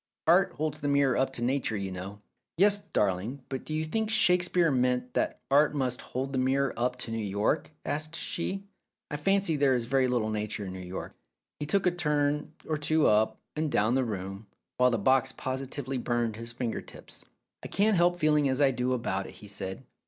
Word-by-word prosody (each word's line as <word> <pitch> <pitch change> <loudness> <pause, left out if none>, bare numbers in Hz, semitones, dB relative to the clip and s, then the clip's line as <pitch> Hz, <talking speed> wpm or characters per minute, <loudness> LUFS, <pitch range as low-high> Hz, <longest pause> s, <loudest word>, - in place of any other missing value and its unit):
Art 175 +4 +4
holds 155 -1 -3
the 145 - -1
mirror 140 -3 +3
up 135 0 +1
to 120 - -4
nature, 125 -3 0
you 95 -1 -3
know." 95 +3 -7 0.4
"Yes, 200 +3 +5
darling; 110 - -1
but 135 -1 -4
do 155 - -3
you 155 - 0
think 220 +7 -1
Shakespeare 180 -5 +3
meant 125 -1 +1
that - - 0
Art 145 +1 +4
must 130 -3 -1
hold 135 +2 -4
the 130 - +1
mirror 135 +1 +1
up 125 +1 0
to 115 - -4
New 115 -1 -2
York?" 105 +9 0 0.2
asked 155 +2 -3
she. 190 +4 -3 0.5
"I 150 - -2
fancy 195 0 +2
there 140 -2 +4
is 120 -2 0
very 130 +1 +2
little 120 -3 0
nature 105 -1 -3
in 95 - -6
New 95 - -7
York." 90 0 -6 0.5
He 150 - -3
took 195 +5 +2
a 180 - +4
turn 150 -3 0 0.2
or 155 -1 -1
two 155 +1 +2
up 110 +1 +3 0.2
and 155 -1 -1
down 110 +3 +2
the 130 0 +2
room, 100 -2 -5 0.3
while 125 0 +5
the 120 - +1
box 130 +5 +3
positively 130 0 -3
burned 120 -2 -1
his 115 +1 -5
finger 120 -1 -3
tips. - - -9 0.4
"I - - -5
can't 210 +1 +2
help 175 0 +4
feeling 150 -4 +3
as 130 +1 +1
I 140 -2 +5
do 125 0 0
about 100 -6 -2
it," - - -12
he 105 - -12
said. 95 -1 -4
130 Hz, 205 wpm, -29 LUFS, 115-155 Hz, 0.5 s, Yes